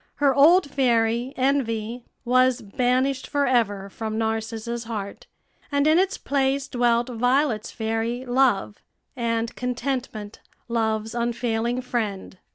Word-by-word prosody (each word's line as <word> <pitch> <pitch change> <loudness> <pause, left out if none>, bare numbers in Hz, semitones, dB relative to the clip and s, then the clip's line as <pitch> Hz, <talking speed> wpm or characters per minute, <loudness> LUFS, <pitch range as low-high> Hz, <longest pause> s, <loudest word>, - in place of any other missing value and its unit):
Her 280 -2 +3
old 315 +5 +6
fairy, 240 -2 +1
Envy, 245 -3 -1 0.2
was 255 0 +3
banished 255 +5 0
forever 240 -9 +1
from 220 +2 -5
Narcissa's 225 +1 -3
heart, 210 -3 -6 0.4
and 285 0 +2
in 310 +3 +5
its 385 +1 +1
place 275 0 0
dwelt 240 -2 +1
Violet's 245 -1 +1
fairy, 225 +2 -2
Love, 245 -5 +1 0.3
and 230 -2 -1
Contentment, 250 -4 -4 0.3
Love's 220 -1 -1
unfailing 235 0 -1
friend. 210 -6 -3
240 Hz, 110 wpm, -24 LUFS, 225-260 Hz, 0.4 s, old